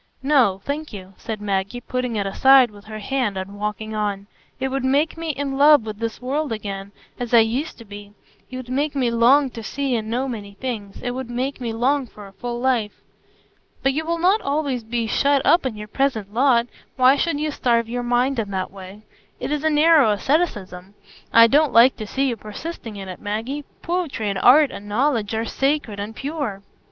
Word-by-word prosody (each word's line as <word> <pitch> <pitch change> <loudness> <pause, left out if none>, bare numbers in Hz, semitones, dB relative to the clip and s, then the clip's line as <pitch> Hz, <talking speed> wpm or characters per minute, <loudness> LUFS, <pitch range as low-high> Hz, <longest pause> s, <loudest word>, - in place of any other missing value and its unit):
"No, 255 -9 +3
thank 300 +2 -4
you," 195 -2 -10
said 220 -2 -5
Maggie, 200 +3 -2
putting 250 -1 -3
it 200 -2 -1
aside 260 +4 +5
with 205 0 -15
her 215 0 -7
hand 215 -2 -2
and 195 +2 -6
walking 210 +1 -4
on. 205 -2 -2 0.3
"It 265 0 -1
would 270 0 -2
make 280 +4 +1
me 330 0 -5
in 275 -2 -3
love 290 -4 +6
with 215 -1 -6
this 230 -1 -4
world 280 +3 -2
again, 200 -2 -5 0.3
as 245 -1 0
I 230 - +8
used 245 +8 -2
to 230 - -12
be; 205 0 -11 0.4
it 255 - -7
would 255 -1 -8
make 285 +3 -1
me 250 -4 +1
long 255 +4 +4
to 230 - -8
see 270 +3 -2
and 220 -1 -3
know 250 +4 -1
many 205 -5 -7
things; 215 -5 -5
it 245 - -1
would 255 -1 -5
make 255 +3 -3
me 235 -2 -2
long 255 +4 0
for 210 -2 -12
a 195 - -14
full 240 +3 -5
life." 240 -5 0 0.9
"But 270 0 +2
you 310 +3 -1
will 335 +1 -1
not 370 +6 +3
always 280 -4 -1
be 230 +1 -2
shut 280 +4 +2
up 335 -6 +4
in 225 -4 -6
your 210 0 -7
present 220 -5 -1
lot; 240 -1 +3 0.3
why 260 +1 +5
should 290 0 -1
you 305 0 -1
starve 235 -4 +1
your 245 +1 -3
mind 245 +2 +1
in 210 -3 -2
that 190 -2 -3
way? 195 +2 -11 0.4
It - - -4
is 300 -1 -1
narrow 310 -3 +5
asceticism; 205 - -1 0.4
I 230 0 +8
don't 290 +5 +3
like 240 +3 +6
to 215 - -6
see 270 +5 0
you 240 -3 -2
persisting 220 +2 -7
in 195 -1 -7
it, 185 - -8
Maggie. 230 +8 -4 0.2
Poetry 335 - -2
and 195 - -3
art 280 +6 +6
and 205 +1 -9
knowledge 225 -2 0
are 225 +1 -1
sacred 270 -6 -1
and 210 +2 -5
pure." 275 -9 -4
240 Hz, 205 wpm, -22 LUFS, 210-275 Hz, 0.9 s, I